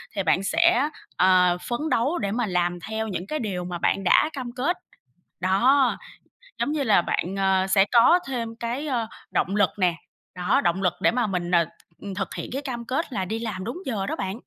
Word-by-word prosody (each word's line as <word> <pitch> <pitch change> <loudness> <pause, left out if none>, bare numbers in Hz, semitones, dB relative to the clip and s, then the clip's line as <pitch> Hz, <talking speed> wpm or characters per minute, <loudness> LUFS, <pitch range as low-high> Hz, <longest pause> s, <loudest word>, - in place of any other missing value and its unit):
thì 195 - 0
bạn 180 +3 +2
sẽ, 325 - +3 0.3
ờ, 180 -1 +4
phấn 240 - -1
đấu 260 +8 +1
để 200 -1 -2
mà 240 +1 0
làm 175 -1 0
theo 220 0 -2
những 190 -2 -4
cái 305 - -2
điều 190 -6 -3
mà 175 -1 -4
bạn 195 +3 0
đã 305 - +4
cam 255 -4 -5
kết. 330 +8 0 0.6
Đó, 250 +9 +3 0.6
giống 290 - 0
như 300 -2 0
là 205 -7 +4
bạn, 180 +3 -2
ờ, 190 -1 +2
sẽ 195 0 +4
có 250 +10 +6
thêm 230 -3 -4
cái, 240 +6 -4
ờ, 235 -5 -1 0.2
động 195 +3 0
lực 200 -3 +4
nè, 180 -3 +2 0.4
đó, 180 +2 +2
động 175 +2 0
lực 180 - +2
để - - +4
mà 240 -2 0
mình, 180 -2 -2
ờ, 170 -2 +4 0.3
th - - -12
thực 195 - -3
hiện - - -5
cái 275 - -2
cam 240 -4 -5
kết 265 +2 -2
là 190 -3 -1
đi 220 +4 -3
làm 210 -5 -4
đúng 250 - -5
giờ 205 -6 -2
đó - - -2
bạn. 190 +2 -3
210 Hz, 215 wpm, -24 LUFS, 185-250 Hz, 0.6 s, có